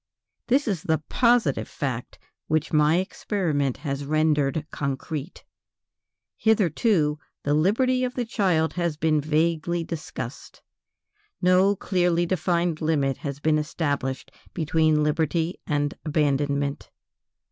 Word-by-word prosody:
This 270 +3 +2
is 190 -7 -1
the 160 0 +1
positive 240 -1 +2
fact 125 -5 -4 0.3
which 155 0 0
my 150 +1 +4
experiment 175 - -1
has 140 -1 -4
rendered 150 0 +1
concrete. 140 +3 -4 0.9
Hitherto 185 - +2 0.2
the 145 - +1
liberty 255 - +2
of 250 0 -2
the 245 - -1
child 180 -8 +1
has 170 -4 -1
been 155 -1 +2
vaguely 165 +3 0
discussed; 145 -6 -7 0.8
no 185 +2 +4
clearly 175 -3 +1
defined 170 -2 0
limit 145 -4 +1
has 140 -3 -5
been 155 0 +2
established 145 -4 -2 0.2
between 155 -1 +2
liberty 160 +3 0
and 145 -1 0
abandonment. 145 -2 0
160 Hz, 110 wpm, -25 LUFS, 145-180 Hz, 0.9 s, my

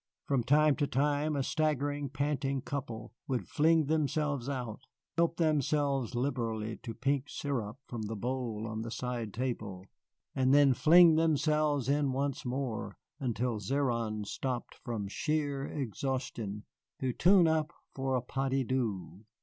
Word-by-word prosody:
From 135 -4 +1
time 150 +3 +4
to 145 - +1
time 145 +3 +1
a 140 - 0
staggering, 145 -1 0
panting 140 -1 -1
couple 125 -7 -5
would 130 -3 -2
fling 160 +1 +3
themselves 150 -3 0
out, 125 -6 -4 0.3
help 170 -1 +2
themselves 145 -5 +1
liberally 115 -4 -2
to 115 -2 -7
pink 140 +2 0
sirop 120 -6 -3
from 120 -2 -5
the 110 +1 -4
bowl 115 -1 -3
on 110 0 -4
the 115 - -5
side 120 -2 -3
table, 110 -6 -4 0.5
and 130 +1 +3
then 145 -2 +6
fling 165 +3 +7
themselves 150 -3 +2
in 140 -1 +2
once 140 +1 -1
more, 125 -6 -3 0.2
until 120 -3 -1
Zéron 115 -2 -1
stopped 125 +3 -3
from 115 -6 -3
sheer 145 +3 -1
exhaustion, 125 -5 -3 0.3
to 130 -2 -1
tune 180 +2 +5
up 160 -1 +1 0.2
for 135 -1 -1
a 125 - 0
pas 135 +2 -2
de 135 0 +1
deux. 110 -7 -2
135 Hz, 140 wpm, -31 LUFS, 115-145 Hz, 0.5 s, fling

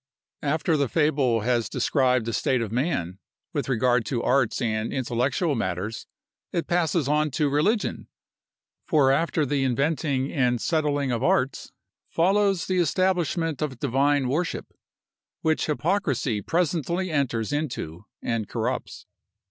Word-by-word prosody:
After 155 +2 +1
the 140 -3 0
fable 140 -7 +2
has 120 0 0
described 125 -4 +1
the 115 - -3
state 130 +2 +1
of 115 -3 -3
man, 110 - -1 0.3
with - - -2
regard 125 -1 +2
to 120 -3 -1
arts 135 -5 +2
and 110 -2 -1
intellectual 130 +6 0
matters, 100 -1 -3 0.4
it 170 - -1
passes 170 -4 +1
on 150 +1 +2
to 145 +2 0
religion; 200 +10 0 0.8
for 140 -4 +4
after 155 +1 +1
the 140 0 0
inventing 140 +1 0
and 125 -4 +2
settling 145 -4 0
of 120 -1 -1
arts, 135 0 +1 0.4
follows 195 +1 +2
the 185 -1 0
establishment 170 -2 +1
of 140 -5 -2
divine 140 +2 +1
worship, 160 +7 -2 0.7
which 160 0 +1
hypocrisy 150 - 0
presently 170 - -1
enters 130 -5 0
into 120 - -4 0.2
and 115 -3 -2
corrupts. - - -3
140 Hz, 130 wpm, -25 LUFS, 125-160 Hz, 0.8 s, for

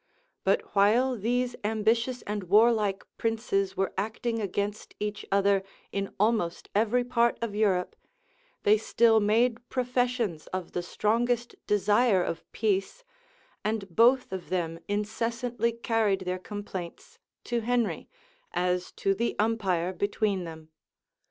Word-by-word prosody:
But - - +1
while 235 +6 +4
these 245 +3 0
ambitious 225 +3 +1
and 205 -2 -4
warlike 210 0 +3
princes 220 -4 0
were 195 - 0
acting 225 +2 -2
against 200 +1 -3
each 210 0 -3
other 200 0 +3 0.3
in 195 0 -2
almost 210 -5 +1
every 225 +4 +2
part 235 -1 +2
of 230 -3 -3
Europe, 200 -4 +1 0.7
they 210 +1 +5
still 225 0 +4
made 230 +3 +1
professions 245 -8 -1
of 185 -2 -5
the 175 - -2
strongest 235 +6 0
desire 210 -1 +3
of 165 -1 -5
peace; 210 - -1 0.6
and 215 -2 -1
both 250 +1 +5
of 190 -2 -6
them 165 -3 -2
incessantly 230 +3 -1
carried 225 -4 0
their 185 0 -3
complaints 205 - -7 0.2
to 240 -1 -1
Henry, 240 0 -1 0.4
as 180 0 0
to 195 - +1
the 230 +4 -1
umpire 195 -5 0
between 200 -1 -1
them. 160 -1 -10
210 Hz, 125 wpm, -28 LUFS, 195-235 Hz, 0.7 s, they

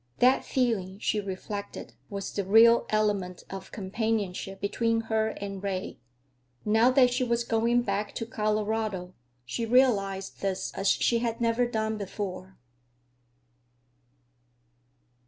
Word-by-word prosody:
That 255 +2 +4
feeling, 215 -7 -1
she 210 0 0
reflected, 200 +1 -6 0.2
was 200 -1 -5
the 200 - -1
real 225 +4 +6
element 205 -4 0
of 195 -1 -8
companionship 195 -2 -2
between 225 +3 0
her 220 -1 0
and 195 -2 -6
Ray. 195 -1 -4 0.7
Now 220 +3 +4
that 255 -1 +4
she 255 - +1
was 235 -1 0
going 235 +1 +2
back 200 -1 -2
to 225 - -3
Colorado, 215 -4 -1 0.3
she 230 - -3
realized 210 -6 +2
this 190 -1 -2
as 195 - -2
she 235 +3 +3
had 230 -1 -2
not 235 +1 +1
done 220 -1 -1
before. 190 -1 -6
215 Hz, 120 wpm, -28 LUFS, 195-230 Hz, 0.7 s, real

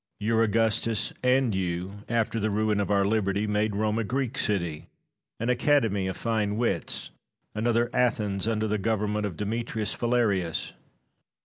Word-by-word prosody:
Your 110 +2 +2
Augustus 115 0 +1
and 125 -2 +3
you, 95 +2 -3
after 115 0 0
the 110 0 0
ruin 105 0 +1
of 100 - -1
our 100 -1 +3
liberty, 100 -1 +1
made 105 0 0
Rome 110 +1 0
a - - 0
Greek 130 +3 -2
city, 85 - -1 0.5
an 115 +2 +1
academy 120 -7 +2
of 95 -1 -4
fine 110 -3 -1
wits, 120 0 -1 0.4
another 115 +2 +1
Athens 105 -5 +1
under 110 -1 0
the 105 0 0
government 105 0 0
of 90 -5 -8
Demetrius 110 0 -1
Phalareus. 105 -9 0
110 Hz, 145 wpm, -27 LUFS, 100-115 Hz, 0.5 s, and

